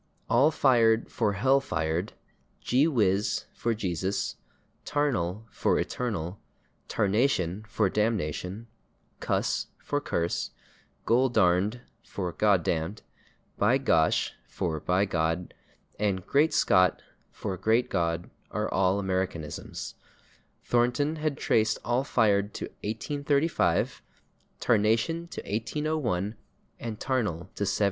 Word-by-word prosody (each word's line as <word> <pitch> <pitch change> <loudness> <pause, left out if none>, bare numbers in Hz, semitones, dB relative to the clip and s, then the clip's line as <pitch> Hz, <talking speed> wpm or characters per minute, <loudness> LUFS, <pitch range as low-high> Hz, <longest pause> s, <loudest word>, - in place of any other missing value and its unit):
/All 135 +6 +6
fired/ 115 -6 +3
for 105 -4 0
/hell 135 +7 +3
fired/, 85 -2 -2 0.5
/gee 135 +5 +3
whiz/ 105 - +1
for 115 -1 -1
/Jesus/, 95 -1 -2 0.5
/tarnal/ 115 -10 0
for - - +1
/eternal/, 100 -7 -2 0.5
/tarnation/ 105 -2 +1
for 105 0 +1
/damnation/, 100 -1 -1 0.5
/cuss/ - - 0
for 145 0 -2
/curse/, 85 -10 -1 0.6
/goldarned/ 115 -3 +3 0.2
for 90 -3 -4
/God 100 -4 +3
damned/, 80 +7 -2 0.6
/by 115 +6 +4
gosh/ 80 -12 +2
for 80 -5 -3
/by 95 +3 +2
God/ 80 0 -1 0.5
and 100 -3 0
/great 150 +3 +3
Scott/ 90 - +3 0.3
for 95 - -4
/great 110 +6 +2
God/ 85 -1 -1 0.2
are - - -2
all 95 +1 +3
Americanisms; 95 -5 -3 0.7
Thornton 125 +6 +1
has 155 -1 0
traced 110 -5 +2
/all 120 +2 +1
fired/ 105 -6 +2
to - - -3 0.2
1835, 145 +7 0 0.6
/tarnation/ 115 +10 +2
to - - -6
1801 115 - -1 0.5
and 110 -3 -5
/tarnal/ 105 -9 -2
to 100 - -2
1790. - - -1
105 Hz, 105 wpm, -28 LUFS, 90-125 Hz, 0.7 s, All